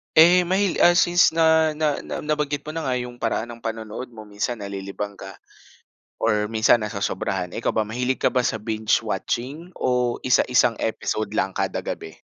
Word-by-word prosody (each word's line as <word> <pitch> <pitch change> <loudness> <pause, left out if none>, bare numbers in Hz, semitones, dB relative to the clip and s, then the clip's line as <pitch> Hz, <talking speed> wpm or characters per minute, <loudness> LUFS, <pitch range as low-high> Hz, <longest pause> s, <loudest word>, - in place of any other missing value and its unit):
Eh, 175 +2 +7
mahil 190 0 +1
ah, 175 0 +6
since 175 -1 +4
na 160 -1 +4
na 150 -2 0
na - - -6
nabanggit 150 -1 -1
mo 155 - -6
na 165 -1 -4
nga 125 - +1
yung 125 -1 -5
paraan 115 +1 -1
ng 115 - -10
panonood 110 +2 -5
mo, 110 -1 -10
minsan 105 +3 -3
nalilibang 100 0 -6
ka 95 0 -9 0.8
or 105 -1 +1
minsan 110 +1 +3
nasosobrahan. 95 -3 -3
Eh, 115 - -5
ikaw - - +1
ba, 110 -1 0
mahilig 125 +4 -1
ka - - +4
ba 125 -1 +2
sa 110 - -1
binge 110 -1 +1
watching 130 - -3
o 125 -1 0
isa 125 - +5
isang 125 -2 +4
episode 110 -1 -2
lang 95 0 0
kada - - -1
gabi? - - -7
120 Hz, 185 wpm, -23 LUFS, 105-150 Hz, 0.8 s, Eh